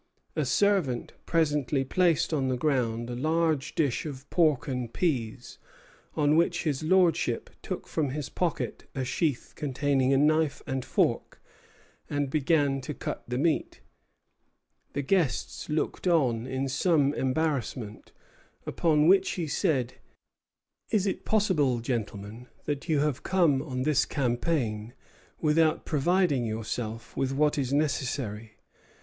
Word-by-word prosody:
A 155 - 0
servant 155 -3 +1
presently 150 -5 +1
placed 170 +1 +2
on 135 -4 +1
the 130 -1 0
ground 120 -5 0
a 120 - -4
large 155 +1 0
dish 145 -6 +1
of 140 -1 -8
pork 155 -6 +2
and 125 -3 -3
peas, 125 -8 -2 0.6
on 150 -1 +3
which 170 +1 +2
his 145 -3 -1
lordship 175 0 +2
took - - -5
from 150 -4 -1
his 145 +1 -4
pocket 175 -4 -3
a 130 -1 -2
sheath 140 +1 -1
containing 140 -2 +1
a 135 - +4
knife 155 +1 +2
and 130 -1 -2
fork - - 0 0.7
and 145 -2 -1
began 145 -2 +2
to 140 +2 -6
cut - - -5
the 125 +1 -2
meat. 155 +3 0 1.1
The 140 - -2
guests 165 -3 0
looked 155 +4 -1
on 130 -9 +2
in 130 +1 -2
some 145 +1 +2
embarrassment; 130 -6 -2 0.5
upon 155 -2 +2
which 190 +1 +5
he 175 - -2
said: 135 - 0 1.0
"Is 205 -3 +1
it 195 - -2
possible, 160 - +2
gentlemen, 115 -1 -4 0.2
that 145 +3 -3
you 150 -3 +3
have 150 -3 0
come 170 -8 +2
on 130 -4 -3
this 150 -1 +2
campaign 120 -4 -1 0.5
without 155 0 +2
providing 155 -2 +2
yourselves 110 +1 -4
with 135 0 0
what 150 +1 +2
is 130 -2 -1
necessary?" 125 -7 -2
145 Hz, 130 wpm, -28 LUFS, 130-160 Hz, 1.1 s, which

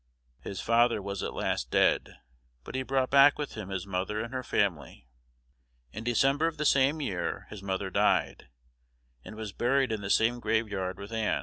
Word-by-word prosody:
His 95 +8 -7
father 115 0 +3
was 100 0 -5
at - - -3
last - - -2
dead; - - +2 0.5
but - - -9
he 130 - -1
brought 130 0 0
back 140 +1 +7
with 150 - -4
him 105 -4 -7
his 95 -1 -4
mother 95 +2 -2
and 115 +3 -5
her 130 - -2
family. 85 - -2 0.9
In 110 - -6
December 135 +6 +2
of 165 -1 -4
the 150 - -2
same 140 +3 +3
year 95 -10 -3
his 105 - -8
mother 95 0 -3
died, - - +1 0.8
and 110 - -10
was 110 -2 -6
buried 130 +3 +1
in 110 -2 -2
the 100 - -5
same 120 +4 +3
graveyard 105 -5 -1
with 100 +3 -9
Ann. 110 -2 0
110 Hz, 185 wpm, -29 LUFS, 100-130 Hz, 0.9 s, back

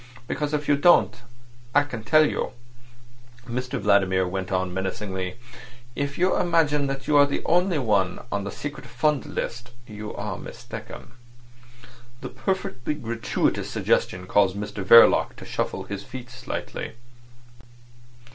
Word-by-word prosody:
Because 150 -1 -2
if 150 -1 -2
you 145 - +5
don't, 175 +5 +5 0.6
I 145 - +6
can 125 -6 -7
tell 155 +4 +5
you," - - -3 0.9
Mr 125 +1 -3
Vladimir 95 -2 +3
went 95 +1 -4
on 95 -1 0
menacingly. 95 0 -3 0.6
"If 140 0 -3
you 185 +2 +2
imagine 150 -4 +2
that 135 0 -5
you 150 - +2
are 145 0 +7
the 140 - -3
only 180 0 +2
one 100 -8 0
on 100 -1 -1
the 100 - -4
secret 145 +3 -7
fund 135 +3 0
list, 120 +1 -4 0.2
you 105 -2 -7
are - - -4
mistaken." - - -9 1.1
This - - -7
perfectly 190 -8 -2
gratuitous 115 -5 -1
suggestion 90 0 0
caused 95 0 +3
Mr 105 -1 -5
Verloc 115 +5 +7
to - - -11
shuffle - - -3
his 100 -1 -6
feet 125 -1 -9
slightly. 125 - -6
120 Hz, 135 wpm, -25 LUFS, 100-145 Hz, 1.1 s, are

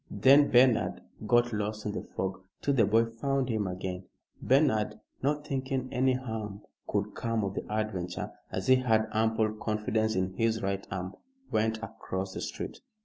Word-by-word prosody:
Then 140 +2 +6
Bernard 125 -1 +4 0.3
got 120 0 +3
lost 105 0 -2
in 105 - -1
the - - -3
fog 95 0 -4 0.2
till 140 - +2
the 115 -6 +4
boy 115 +2 +4
found 130 +3 -1
him 110 -4 0
again. 90 0 -4 0.4
Bernard, 110 -6 +2 0.2
not 145 +2 0
thinking 130 -2 -2
any 130 +1 +3
harm 110 -5 -4 0.2
could - - -1
come 115 -2 -1
of 100 -1 -2
the - - -5
adventure, 105 -5 -2 0.2
as 95 - -3
he 130 - +6
had 110 -4 +2
ample 110 0 +2
confidence 110 0 0
in 95 0 0
his 110 +2 0
right 100 0 -2
arm, 95 0 -4 0.4
went 110 +1 +1
across 95 -4 -4
the - - -5
street. - - -5
110 Hz, 165 wpm, -30 LUFS, 100-125 Hz, 0.4 s, Then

